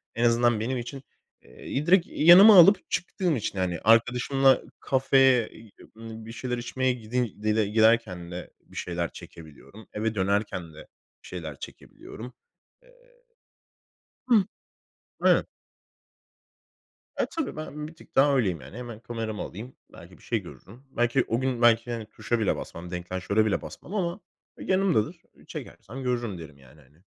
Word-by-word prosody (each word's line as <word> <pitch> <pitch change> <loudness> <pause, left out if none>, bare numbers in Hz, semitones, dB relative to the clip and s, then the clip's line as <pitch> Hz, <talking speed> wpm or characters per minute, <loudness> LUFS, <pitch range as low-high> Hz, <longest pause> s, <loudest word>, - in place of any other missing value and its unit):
en 115 +1 +1
azından 120 -1 +3
benim 125 +4 -2
için, 130 +3 -7 0.4
eee, 145 +3 -6
direkt 180 0 +4
yanıma 185 +7 +8
alıp 195 +4 +6
çıktığım 175 -2 -1
için 100 -4 -3
hani 90 -2 -1
arkadaşımla 125 +4 +3 0.2
kafeye, 130 -3 +3
iii, 110 -2 -16 0.2
bir 115 0 -9
şeyler 125 +1 -4
içmeye 130 +2 -1
gidi 120 -1 -3 0.4
giderken 110 -6 +2
de 90 0 -7
bir - - -19
şeyler 85 -1 -3
çekebiliyorum. 85 +7 -13
Eve 110 +1 -2
dönerken 95 -4 -1
de 75 - -13 0.4
bir - - -13
şeyler 80 -6 -7
çekebiliyorum. 125 +3 -11 0.5
Eee. - - -22 1.4
Hıh. 225 -5 +5 0.8
Evet. - - +4 1.7
Eee, - - +1
tabii, 325 -4 -3
ben 150 -1 -6
bir 160 - -13
tık - - -19
daha 140 +1 +5
öyleyim 95 - 0
yani. 70 - -11
Hemen 120 -3 -8
kameramı 115 -2 -5
alayım, 115 +7 -8 0.2
belki - - -14
bir - - -22
şey - - -1
görürüm. 120 +8 -14
Belki 120 +2 +1
o 115 - 0
gün 130 -2 -2
belki, 120 0 +4
hani, 115 -2 -4
tuşa 110 +2 -3
bile 110 - +1
basmam, 85 +1 -8
deklanşöre 95 +4 -1
bile 105 - 0
basmam 190 - -10
ama 180 0 -2 0.4
yanımdadır. 185 - 0 0.3
Çekersem 130 +6 -9
görürüm 120 -6 -2
derim 80 -4 -11
yani 70 +3 -19
hani. 75 +6 -26
115 Hz, 145 wpm, -26 LUFS, 100-130 Hz, 1.7 s, yanıma